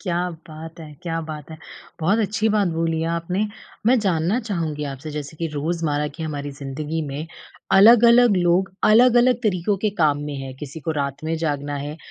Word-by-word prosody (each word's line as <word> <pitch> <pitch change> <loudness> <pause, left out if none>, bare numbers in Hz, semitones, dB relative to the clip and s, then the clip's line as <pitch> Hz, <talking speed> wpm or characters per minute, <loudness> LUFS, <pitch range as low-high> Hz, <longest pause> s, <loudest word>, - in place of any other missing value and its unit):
क्या 180 -2 -1 0.2
बात 160 +1 -10
है! 155 -2 -10
क्या 165 -1 -2
बात 155 -2 -8
है! 160 - -8 0.4
बहुत 190 +7 +2
अच्छी 220 +1 0
बात 210 -3 +2
बोली 165 -1 -1
आपने। 180 +5 -1 0.4
मैं 250 +2 +5
जानना 185 +1 +1
चाहूँगी 165 -9 -3
आपसे 135 +4 -8
जैसे 150 0 -6
कि 165 - -2
रोज़मर्रा 150 -1 -1
की - - -6
हमारी 145 -2 -4
ज़िन्दगी 150 +4 -4
में, 145 +3 -5 0.5
अलग-अलग 235 +2 +7
लोग 180 +2 +2 0.2
अलग-अलग 245 +2 +5
तरीकों 200 -1 +1
के 215 - +3
काम 150 -3 +3
में 145 - -5
हैं, 135 -1 -7
किसी 150 +2 -7
को 155 - -3
रात 140 +1 -4
में 160 +1 -1
जागना 145 -2 -2
है, 145 +2 -5
165 Hz, 180 wpm, -22 LUFS, 150-195 Hz, 0.5 s, अलग-अलग